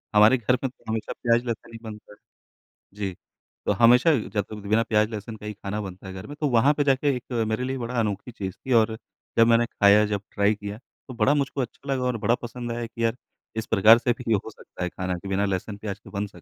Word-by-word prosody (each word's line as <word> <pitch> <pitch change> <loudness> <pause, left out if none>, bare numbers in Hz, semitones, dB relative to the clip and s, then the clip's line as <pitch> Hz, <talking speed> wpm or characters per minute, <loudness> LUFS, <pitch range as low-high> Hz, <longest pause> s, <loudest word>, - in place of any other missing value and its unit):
हमारे 105 +5 +7
घर 125 +2 +1
में 135 - 0
तो 125 - -27
हमेशा 110 -1 -3
प्याज़-लहसुन 115 -1 0
ही 115 - -8
बनता 105 -2 -10
है। - - -20 0.8
जी, 100 -2 -3 0.5
तो - - +2
हमेशा 125 +7 +6 0.2
जब 100 -2 +1 0.2
बिना 110 +2 +3
प्याज़-लहसुन 110 0 -1
का 105 - -11
ही 105 - -4
ख़ाना 105 +1 -4
बनता 95 -1 -8
है 95 - -7
घर 95 +2 -8
में 145 - -8
तो 150 - +2
वहाँ 130 +4 +4
पे 145 - +3
जाके 140 0 +2
एक 125 +1 -9
मेरे 110 +3 -1
लिए 130 +1 -2
बड़ा 120 0 -2
अनोखी 105 +2 -2
चीज़ 95 -5 -5
थी 130 - -3
और 110 0 -2 0.4
जब 115 - +6
मैंने 115 0 +4
ख़ाया 105 -1 +5
जब 105 -1 -2
ट्राई 100 +1 +3
किया, 105 0 -7
तो 125 +2 -15
बड़ा 120 +4 +3
मुझको 140 -1 -1
अच्छा 130 +3 -7
लगा 130 - -1
और 125 -2 0
बड़ा 115 +2 +2
पसंद 120 0 -5
आया 120 0 -3
कि 115 0 -6
यार 115 +1 0 0.4
इस 110 - -2
प्रकार 110 +4 +7
से 120 0 +1
भी 115 -2 0
हो 105 +1 -1
सकता 105 - -9
है 90 - -1
ख़ाना 95 0 -3
कि 100 - -9
बिना 95 +1 +1
लहसुन-प्याज़ 100 +1 -4
के - - -12
बन 105 - -1
सक 90 -4 -16
110 Hz, 240 wpm, -25 LUFS, 105-120 Hz, 0.8 s, हमारे